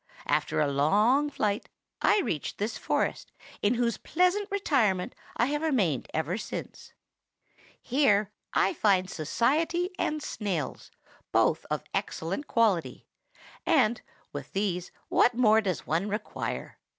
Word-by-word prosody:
After - - +1
a 155 - +4
long 210 - +3
flight, 210 -6 -1 0.3
I 420 - +4
reached 160 - -3
this 210 +3 -2
forest, - - -1 0.3
in 210 +4 +2
whose 235 -1 0
pleasant 365 +5 +1
retirement 255 - +1 0.2
I 235 - +3
have 295 +3 -1
remained 210 - +1
ever 160 +6 -1
since. - - -7 0.9
Here 215 -7 +2 0.2
I - - +2
find 195 - +2
society 320 - 0
and 305 -1 -1
snails, 180 - -3 0.4
both - - +2
of - - -2
excellent 190 - -3
quality; 215 -8 +1 0.6
and, 245 -8 +3 0.3
with - - -7
these, 185 -3 -1 0.2
what 240 - +3
more 220 -2 +5
does 185 -5 -2
one 170 +7 0
require? 210 +2 -4
215 Hz, 125 wpm, -28 LUFS, 185-285 Hz, 0.9 s, more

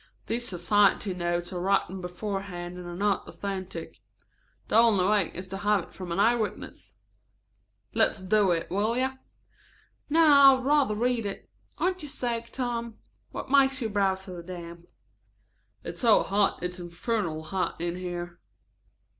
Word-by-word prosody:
These 240 +1 -3
society 195 +2 +2
notes 175 0 -2
are 175 - -3
written 190 0 0
beforehand 180 -1 -5
and 180 -1 -8
are 175 - -6
not 200 +1 0
authentic. 190 -4 -6 0.7
The - - -1
only 220 -5 +5
way 205 -4 +2
is 185 +1 -6
to 195 - -5
have 205 -2 +1
it - - -16
from 185 -2 -7
an 170 - -1
eye 225 +4 +5
witness. 210 - -5 1.0
Let's 220 -3 +2
do 205 +1 +3
it, 170 -1 -1
will 215 +5 0
you?" 260 +1 +1 1.0
"No, 325 +2 +5
I 275 -1 +9
would 260 -1 -5
rather 285 -6 +3
read 235 -1 0
it. 195 - -7 0.3
Aren't 365 +3 0
you 295 - -7
sick, 235 -4 -3
Tom? 235 -3 -3 0.3
What - - -7
makes 270 -1 +4
your 225 -4 -3
brow 195 -2 +2
so 185 -2 -8
damp?" 170 -1 -8 1.0
"It's 170 - -7
so 230 -3 +5
hot, 200 -1 +1
it's 180 +1 -3
infernally 175 -1 -3
hot 185 +3 -3
in 170 +1 -2
here." 175 -1 -6
195 Hz, 155 wpm, -27 LUFS, 180-230 Hz, 1.0 s, I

